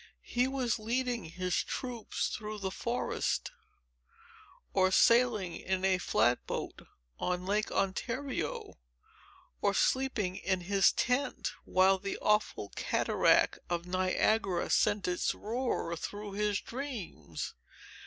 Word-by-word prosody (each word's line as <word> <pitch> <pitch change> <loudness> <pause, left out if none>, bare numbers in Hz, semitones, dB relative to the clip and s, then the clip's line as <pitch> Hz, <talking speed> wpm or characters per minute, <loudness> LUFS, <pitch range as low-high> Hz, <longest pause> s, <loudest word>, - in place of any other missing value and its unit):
He 245 +1 +3
was 260 -4 0
loading 240 +2 -1
his 180 +2 -3
troops 245 -3 -3
through 215 0 -5
the 195 -2 -3
forest, 235 +5 -1 1.2
or 190 -1 +4
sailing 220 -4 +4
in 190 +1 -1
a 190 -1 +3
flat 120 -8 +2
boat - - -5 0.3
on 180 0 -1
Lake 210 +2 0
Ontario, 235 - -2 0.8
or - - +2
sleeping 220 -9 +1
in 185 0 -1
his 195 +2 +4
tent, 255 +2 0
while 190 +1 +4
the 195 +1 -3
awful 210 - +1
cataract - - +3
of 170 -1 -1
Niagara 185 +1 +1
sent 205 -2 +2
its 180 0 0
roar 225 -6 -2
through 205 +5 -6
his 205 0 0
dreams. 235 - -6
205 Hz, 115 wpm, -32 LUFS, 185-240 Hz, 1.2 s, or